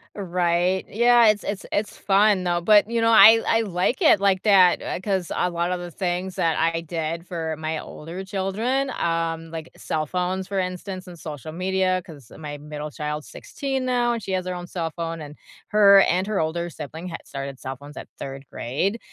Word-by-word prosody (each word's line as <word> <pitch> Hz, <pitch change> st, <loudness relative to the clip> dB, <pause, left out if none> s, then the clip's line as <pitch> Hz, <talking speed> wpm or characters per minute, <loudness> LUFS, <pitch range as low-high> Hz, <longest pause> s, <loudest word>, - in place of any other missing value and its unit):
Right. 180 Hz, -1 st, 0 dB
Yeah, 235 Hz, +1 st, +5 dB
it's 210 Hz, -1 st, +3 dB
it's 200 Hz, -1 st, -4 dB
it's 205 Hz, 0 st, -1 dB
fun, 200 Hz, -1 st, +3 dB
though, 175 Hz, -1 st, 0 dB
but, 210 Hz, +3 st, +5 dB
you 235 Hz, 0 st, 0 dB
know, 230 Hz, 0 st, +3 dB
I 225 Hz, 0 st, +8 dB
I 225 Hz, 0 st, +3 dB
like 195 Hz, -, -1 dB
it 305 Hz, -, +6 dB
like 195 Hz, -2 st, +2 dB
that, 190 Hz, -4 st, +5 dB
uh, -, -, -3 dB
a -, -, -10 dB
'cause 190 Hz, -4 st, -2 dB
a 180 Hz, -, 0 dB
lot 170 Hz, +1 st, -1 dB
of 180 Hz, -, -1 dB
the 175 Hz, -1 st, -7 dB
things 180 Hz, +1 st, -3 dB
that 165 Hz, -2 st, +1 dB
I 165 Hz, +1 st, +1 dB
did 165 Hz, +1 st, -4 dB
for 160 Hz, -3 st, -3 dB
my 155 Hz, 0 st, -2 dB
older 170 Hz, +6 st, -8 dB
children, 220 Hz, +8 st, -1 dB
um, 165 Hz, -4 st, -2 dB
like, 165 Hz, 0 st, -7 dB
cell 155 Hz, -1 st, -2 dB
phones, 185 Hz, +2 st, -2 dB
for 200 Hz, -1 st, -3 dB
instance, 185 Hz, +1 st, -4 dB
and 175 Hz, -1 st, -10 dB
social 155 Hz, -1 st, -7 dB
media, 185 Hz, +1 st, 0 dB
'cause 145 Hz, -8 st, -13 dB
my 150 Hz, -2 st, -7 dB
middle 150 Hz, +1 st, -7 dB
child's 150 Hz, 0 st, -5 dB
16 270 Hz, -2 st, -4 dB
now, 245 Hz, -1 st, +1 dB
and 230 Hz, -3 st, -4 dB
she 190 Hz, -, -5 dB
has 185 Hz, -1 st, -1 dB
her 180 Hz, -, -3 dB
own 175 Hz, 0 st, -6 dB
cell 170 Hz, -2 st, -3 dB
phone, 165 Hz, 0 st, -5 dB
and 150 Hz, 0 st, -9 dB, 0.3 s
her 200 Hz, -2 st, +7 dB
and 185 Hz, +1 st, +2 dB
her 210 Hz, -2 st, -1 dB
older 170 Hz, +2 st, -2 dB
sibling 160 Hz, +4 st, -8 dB
had 170 Hz, -, -8 dB
started 135 Hz, -1 st, -6 dB
cell 135 Hz, 0 st, -5 dB
phones 145 Hz, +3 st, -13 dB
at -, -, -8 dB
3rd 135 Hz, 0 st, -7 dB
grade, 190 Hz, -, -2 dB
180 Hz, 205 wpm, -23 LUFS, 160-200 Hz, 0.3 s, I